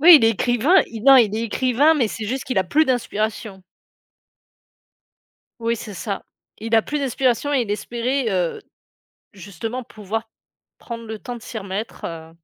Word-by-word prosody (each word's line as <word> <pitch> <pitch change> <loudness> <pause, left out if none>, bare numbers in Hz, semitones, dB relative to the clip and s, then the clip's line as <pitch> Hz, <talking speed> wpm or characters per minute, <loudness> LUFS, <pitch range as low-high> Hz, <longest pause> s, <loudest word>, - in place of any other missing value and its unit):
Oui, 335 +2 +10
il 275 - +3
est 225 - +6
écrivain, 245 - +3
il 225 -2 -7
non, 270 0 +9
il 220 -5 +4
est 225 - -1
écrivain, 255 +7 +3
mais 255 -8 +1
c'est 215 0 -5
juste 260 +5 -3
qu'il 255 - -1
a 190 - +2
plus 300 - +3
d'inspiration. 220 -6 -2 2.0
Oui, 230 0 0
c'est 210 -2 -8
ça. 200 +1 -4 0.4
Il 225 +1 -2
a 225 - +5
plus 295 - -3
d'inspiration 265 0 0
et 275 - +3
il 215 - -6
espérait, 240 +5 -1
heu, 180 -4 -1 0.7
justement 205 +6 -6
pouvoir 225 +1 -5 0.5
prendre 230 -1 -8
le 220 -1 -6
temps 245 +2 -6
de 235 - -10
s'y 225 - -7
remettre, 200 +2 -5
heu 165 -1 -7
230 Hz, 175 wpm, -22 LUFS, 210-255 Hz, 2.0 s, Oui